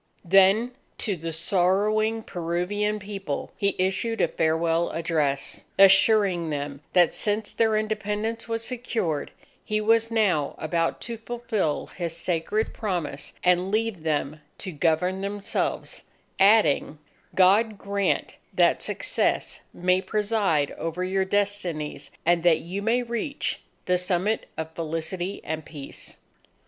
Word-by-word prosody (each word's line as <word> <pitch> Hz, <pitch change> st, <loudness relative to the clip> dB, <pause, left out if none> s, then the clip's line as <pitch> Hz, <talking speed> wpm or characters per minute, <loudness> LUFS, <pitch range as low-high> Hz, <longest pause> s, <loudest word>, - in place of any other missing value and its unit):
Then, 195 Hz, +6 st, +5 dB, 0.3 s
to 205 Hz, -4 st, -2 dB
the 165 Hz, 0 st, -5 dB
sorrowing 205 Hz, +6 st, +1 dB
Peruvian 180 Hz, +5 st, -1 dB
People, 195 Hz, -7 st, -5 dB
he 200 Hz, -1 st, 0 dB
issued 190 Hz, +5 st, 0 dB
a -, -, +4 dB
farewell 165 Hz, +1 st, +1 dB
address, 155 Hz, -4 st, -1 dB
assuring 195 Hz, -3 st, +5 dB
them, 145 Hz, -1 st, -4 dB
that 175 Hz, -2 st, +5 dB
since 210 Hz, 0 st, -1 dB
their 220 Hz, -1 st, +2 dB
Independence 215 Hz, +1 st, -2 dB
was 230 Hz, 0 st, -2 dB
secured, 225 Hz, -, -2 dB, 0.3 s
he 215 Hz, 0 st, -1 dB
was 225 Hz, +1 st, +3 dB
now 195 Hz, -11 st, +1 dB
about 165 Hz, +1 st, -1 dB
to 235 Hz, -1 st, -5 dB
fulfil 225 Hz, -8 st, -2 dB
his 170 Hz, -2 st, -5 dB
sacred 175 Hz, +6 st, -1 dB
promise 175 Hz, -9 st, -3 dB
and 180 Hz, +1 st, +3 dB
leave 215 Hz, -3 st, -1 dB
them 150 Hz, -1 st, -2 dB, 0.2 s
to 190 Hz, -, -6 dB
govern 170 Hz, +4 st, +1 dB
themselves, 200 Hz, 0 st, -2 dB, 0.4 s
adding: 195 Hz, -7 st, +4 dB, 0.4 s
"_God 205 Hz, +4 st, +4 dB
grant 200 Hz, 0 st, -1 dB, 0.2 s
that -, -, +4 dB
success -, -, -1 dB
may 180 Hz, +1 st, +1 dB
preside 205 Hz, -9 st, +1 dB
over 165 Hz, +2 st, -3 dB
your 190 Hz, +1 st, 0 dB
destinies, 190 Hz, -8 st, -1 dB, 0.2 s
and 170 Hz, 0 st, +3 dB
that 170 Hz, -2 st, +4 dB
you 185 Hz, +4 st, -5 dB
may 235 Hz, +4 st, +1 dB
reach 235 Hz, +4 st, -3 dB, 0.2 s
the 180 Hz, 0 st, +2 dB
summit 185 Hz, +4 st, 0 dB
of 160 Hz, 0 st, -4 dB
felicity 165 Hz, +4 st, -3 dB
and 160 Hz, 0 st, -4 dB
peace. 145 Hz, -2 st, -9 dB
190 Hz, 125 wpm, -25 LUFS, 165-215 Hz, 0.4 s, Then